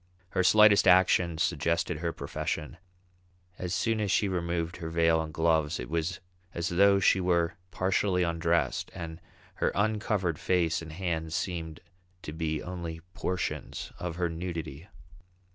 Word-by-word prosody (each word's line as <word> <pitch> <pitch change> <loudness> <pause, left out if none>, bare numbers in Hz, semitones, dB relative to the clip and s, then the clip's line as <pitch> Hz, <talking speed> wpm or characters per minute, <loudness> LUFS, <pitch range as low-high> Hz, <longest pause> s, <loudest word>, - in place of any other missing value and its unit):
Her 95 - +1
slightest 105 +1 +6
action 90 -2 +4
suggested 85 0 0
her 85 0 -1
profession; 75 -3 -4 0.8
as 90 -1 -4
soon 115 -1 0
as 105 - -1
she 100 - +2
removed 85 -2 -2
her 85 -2 -5
veil 80 0 +3
and 80 -1 -5
gloves 80 -1 +1
it - - -6
was 85 +2 -1 0.4
as 85 0 -1
though 100 +2 +5
she 95 0 +4
were 85 -1 +1 0.2
partially 95 0 +1
undressed, 85 0 0
and 85 0 -7 0.4
her - - +1
uncovered 105 -5 0
face 85 -2 +1
and 80 -1 -8
hands 80 -2 -3
seemed 80 -4 -4 0.4
to 75 - -6
be 80 -1 -2
only 85 -2 -6
portions 90 -1 -3
of 85 -2 -4
her 90 0 0
nudity. 85 -2 -5
85 Hz, 145 wpm, -29 LUFS, 80-90 Hz, 0.8 s, slightest